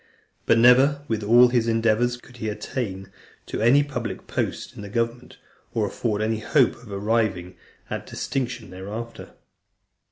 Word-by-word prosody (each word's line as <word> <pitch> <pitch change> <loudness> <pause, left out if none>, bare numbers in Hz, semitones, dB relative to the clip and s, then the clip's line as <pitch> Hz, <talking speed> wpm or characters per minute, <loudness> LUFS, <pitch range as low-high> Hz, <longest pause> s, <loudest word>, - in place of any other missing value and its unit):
But 115 - +5
never, 130 +5 +5
with 110 -3 -1
all 120 +4 +6
his 120 -2 +1
endeavours, 115 +2 +2
could 120 0 -17
he 110 -2 -3
attain 95 -3 -5 0.3
to - - -4
any 130 +6 +5
public 125 -7 -5
post - - -3
in - - -8
the 100 - -8
government, 115 +3 -3 0.4
or 110 -2 +2
afford 105 +1 -2
any 110 0 0
hope 125 +3 +3
of 115 -4 -13
arriving 100 -3 -1 0.3
at - - -5
distinction 125 -6 -4
thereafter. 105 +5 -7
115 Hz, 150 wpm, -24 LUFS, 105-125 Hz, 0.4 s, all